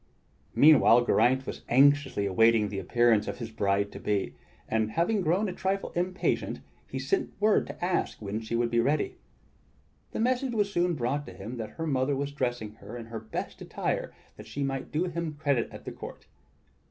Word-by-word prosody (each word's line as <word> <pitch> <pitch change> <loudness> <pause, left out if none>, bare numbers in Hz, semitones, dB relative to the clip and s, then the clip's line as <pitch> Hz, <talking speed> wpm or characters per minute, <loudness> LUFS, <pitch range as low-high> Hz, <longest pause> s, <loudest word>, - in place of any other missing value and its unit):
Meanwhile 135 -5 +7
Geraint 130 +2 +3
was - - -6
anxiously 135 -4 +4
awaiting 110 +2 +4
the 100 -1 -4
appearance 110 +2 +3
of - - -4
his 115 -2 -6
bride 100 -2 0
to - - -8
be; 100 -8 -1 0.3
and, 110 -1 0
having 200 +5 +1
grown 180 +5 +1
a 185 - -3
trifle 195 +1 -2
impatient, 185 +2 -1 0.3
he - - -5
sent 390 - -1
word 210 +1 +3
to - - -5
ask 180 0 -1
when 105 +1 -3
she 115 +1 -3
would 120 0 +1
be 120 - +3
ready. 155 - +1 0.9
The - - -4
message 250 +1 +1
was 205 -2 +1
soon 175 -1 +2
brought 140 +3 -2
to - - -8
him 115 +6 -7
that 110 -2 -4
her 165 - -2
mother 135 -2 +1
was 140 +1 -2
dressing 120 -6 -2
her 120 +2 -9
in 115 - -7
her 115 0 -6
best 110 0 -6
attire - - -2 0.3
that 105 - -11
she 140 +6 -3
might 135 -1 -3
do 155 +3 +1
him 170 -3 -3
credit 140 -5 0
at - - -11
the - - -5
court. - - -9
130 Hz, 190 wpm, -28 LUFS, 115-170 Hz, 0.9 s, Meanwhile